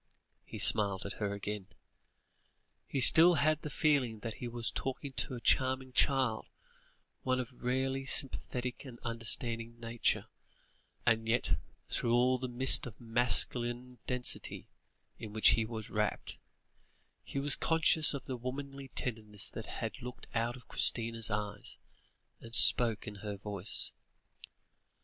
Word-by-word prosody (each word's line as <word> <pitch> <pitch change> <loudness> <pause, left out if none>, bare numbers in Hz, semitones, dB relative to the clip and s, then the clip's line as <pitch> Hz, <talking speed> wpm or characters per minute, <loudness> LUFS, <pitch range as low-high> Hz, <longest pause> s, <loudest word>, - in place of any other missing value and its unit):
He - - -10
smiled 100 -3 +4
at 100 - -7
her 100 -1 -1
again. 100 -1 -6 1.2
He 140 - -3
still 165 +7 +9
had 155 0 +1
the 150 - -6
feeling 135 -7 0
that 115 0 -5
he 120 - -4
was 120 -1 -3
talking 135 +1 -5
to 130 - -3
a - - -7
charming 130 +2 +1
child, 130 -4 +2 0.7
one 130 0 -1
of 125 0 -6
rarely 130 +2 -2
sympathetic 125 -2 -1
and 130 -4 -11
understanding 115 0 0
nature; 115 0 -2 0.8
and 115 -1 +1
yet, 120 -10 +1 0.3
through 120 0 0
all 125 +1 +2
the 130 - -4
mist 130 +1 +5
of 110 - -12
masculine 120 +1 0
density 125 -1 -2 0.5
in 110 -3 -9
which 110 - +4
he 110 +1 +2
was 110 -1 -8
wrapped, 105 0 -2 0.8
he - - -8
was 140 0 +3
conscious 160 -2 +2
of 140 - -8
the 130 - -5
womanly 135 +2 -7
tenderness 105 -5 -4
that 110 - -8
had 115 +4 -6
looked 125 0 -9
out 120 +1 -1
of 125 - -16
Christina's 115 -1 +2
eyes, 105 0 -5 0.6
and 115 0 -7
spoken 110 -3 +4
in - - -14
her 105 -1 -6
voice. 100 0 +1
120 Hz, 140 wpm, -32 LUFS, 110-130 Hz, 1.2 s, still